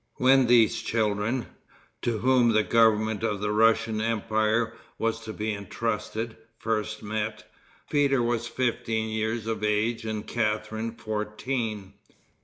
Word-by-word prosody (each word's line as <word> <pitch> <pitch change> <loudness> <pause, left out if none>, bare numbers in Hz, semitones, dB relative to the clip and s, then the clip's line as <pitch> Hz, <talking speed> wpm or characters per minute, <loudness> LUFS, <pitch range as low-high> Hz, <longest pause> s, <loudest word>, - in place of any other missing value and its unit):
When 130 0 +5
these 115 -2 +4
children, 110 +2 0 0.6
to 120 -2 0
whom 125 0 +3
the 110 0 +4
government 110 -2 +3
of 105 -3 -1
the 105 +1 -1
Russian 110 0 +3
empire 110 0 +1 0.2
was 115 0 -1
to 110 - -5
be 110 0 -2
intrusted, 110 +2 -3 0.2
first 110 -1 -2
met, 105 0 -3 0.4
Peter 140 -4 +2
was 120 0 0
fifteen 115 -3 -1
years 110 +1 -2
of 110 -1 -3
age 105 +2 +1
and 110 -1 -4
Catharine 110 0 -2
fourteen. 105 -1 -3
110 Hz, 125 wpm, -27 LUFS, 105-115 Hz, 0.6 s, When